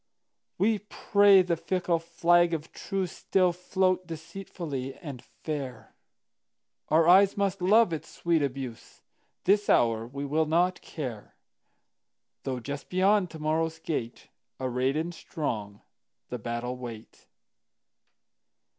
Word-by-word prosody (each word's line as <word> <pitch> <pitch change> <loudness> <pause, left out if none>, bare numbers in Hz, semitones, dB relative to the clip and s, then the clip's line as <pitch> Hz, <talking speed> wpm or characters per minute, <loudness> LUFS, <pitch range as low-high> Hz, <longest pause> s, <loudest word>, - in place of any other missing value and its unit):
We 215 +2 +2
pray 200 -1 +4
the 175 -1 0
fickle 175 0 0
flag 170 +1 +3
of 160 0 -7
truceStill 185 -1 0
float 185 0 0
deceitfully 160 -5 -6
and 140 -7 -8
fair; 140 -5 -7 1.0
Our 160 +1 +4
eyes 195 +3 +6
must 195 -1 0
love 205 0 +5
its 155 - -5
sweet 170 -2 0
abuse; 135 -4 -5 0.4
This 205 +2 +3
hour 115 -1 +3
we 140 +3 -5
will 155 +3 +1
not 175 +3 +2
care, 125 -9 -7 1.1
Though 130 -2 -2
just 140 +3 -6
beyond 190 +1 +3
to 160 - -9
morrow's 160 +1 0
gate, 135 -8 -4 0.3
Arrayed 130 +2 0
and 165 +2 -2
strong, 105 -11 -4 0.5
the 125 - -4
battle 120 +3 -4
wait. 115 -3 -10
160 Hz, 115 wpm, -28 LUFS, 130-185 Hz, 1.1 s, eyes